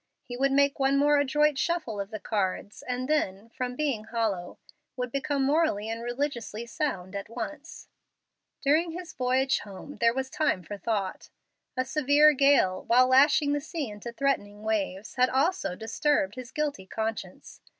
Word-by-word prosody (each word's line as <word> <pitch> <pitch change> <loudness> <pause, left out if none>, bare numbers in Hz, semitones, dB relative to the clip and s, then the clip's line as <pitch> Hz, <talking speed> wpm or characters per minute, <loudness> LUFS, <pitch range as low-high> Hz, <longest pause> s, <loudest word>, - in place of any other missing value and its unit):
He 245 - -7
would 275 +2 +1
make 280 +1 +3
one 275 +1 +3
more 290 +1 +4
adroit 295 0 +2
shuffle 315 -12 -1
of 200 - -6
the 215 -1 -6
cards, 200 -1 -2
and 250 0 -3
then, 225 -8 -1
from 250 +1 -4
being 265 -7 -1
hollow, 215 -6 -2 0.4
would 250 -1 -3
become 275 +1 -1
morally 275 -7 +1
and 225 +1 -4
religiously 240 -3 -3
sound 205 - -3
at 200 +1 -5
once. 300 +6 -7 0.8
During 320 +4 +2
his 355 0 -7
voyage 260 +1 +1
home, 205 +8 -10
there 230 0 +4
was 265 +2 -3
time 200 -12 0
for 205 +5 -7
thought. 200 -1 -2 0.5
A 255 - +1
severe 295 +2 +5
gale, 275 -10 +3
while 250 +2 +6
lashing 285 +3 +5
the 290 - 0
sea 305 -3 -4
into 210 +3 -7
threatening 215 -6 -1
waves, 210 -2 -2
had 255 +1 +4
also 275 - 0
disturbed 225 0 0
his 250 0 -8
guilty 290 -11 -3
conscience. 220 +1 -5
255 Hz, 160 wpm, -28 LUFS, 215-285 Hz, 0.8 s, while